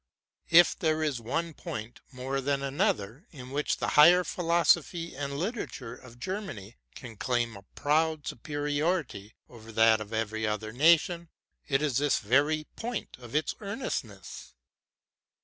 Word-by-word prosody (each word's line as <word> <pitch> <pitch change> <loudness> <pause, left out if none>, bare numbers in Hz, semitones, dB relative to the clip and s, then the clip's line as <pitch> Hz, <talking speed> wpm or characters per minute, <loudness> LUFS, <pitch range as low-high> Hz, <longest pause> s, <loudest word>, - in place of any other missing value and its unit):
If 175 +1 +7
there 155 -1 0
is 140 -6 -1
one 165 +8 -2
point 110 -4 -7
more 135 +1 -3
than 140 0 -1
another 135 - -1
in 130 -4 -11
which 145 +2 -1
the - - -1
higher 175 +5 +7
philosophy 170 -1 +1
and 140 0 -4
literature 170 - -4
of 120 -1 -14
Germany 125 - -6 0.2
can 115 -4 -10
claim 120 -2 -1
a 100 0 -12
proud 155 0 +1
superiority 145 - -2
over 115 -2 -13
that 110 0 +5
of 105 0 -8
every 110 0 -2
other 105 0 -3
nation, 170 - +3 0.4
it 135 +1 +1
is 140 -4 +1
this 145 -1 +2
very 145 +8 +2
point 240 -1 -5
of 120 +1 -10
its 155 - +1
earnestness. 145 - -6
140 Hz, 140 wpm, -29 LUFS, 115-165 Hz, 0.4 s, If